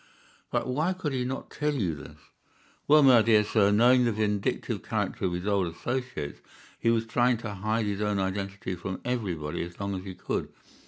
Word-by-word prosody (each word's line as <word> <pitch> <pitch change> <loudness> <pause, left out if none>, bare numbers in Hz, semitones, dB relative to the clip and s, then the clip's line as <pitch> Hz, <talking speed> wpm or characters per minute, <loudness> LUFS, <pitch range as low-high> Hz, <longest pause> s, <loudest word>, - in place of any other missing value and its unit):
"But - - 0
why 155 +8 0
could 165 -6 -3
he 125 -1 0
not 130 +2 -5
tell 150 0 -1
you 95 - 0
this?" 75 +1 -10 0.7
"Well, 150 0 +7
my 130 -4 +7
dear 110 -1 +5
sir, 105 -1 +3
knowing 120 +5 +5
the 120 - +2
vindictive 105 -2 -1
character - - -2
of 90 - 0
his 90 +2 -4
old 100 -3 +1
associates, 125 - -4 0.4
he 115 - +2
was 115 -1 +2
trying 120 +1 +2
to 110 -2 -6
hide 110 +3 -1
his 100 0 -2
own 105 -1 0
identity 95 0 -3
from 95 +1 -5
everybody 95 -12 -2
as 85 0 -7
long 100 0 -2
as 95 -1 -4
he 95 -1 -7
could. - - -3
105 Hz, 195 wpm, -28 LUFS, 95-125 Hz, 0.7 s, Well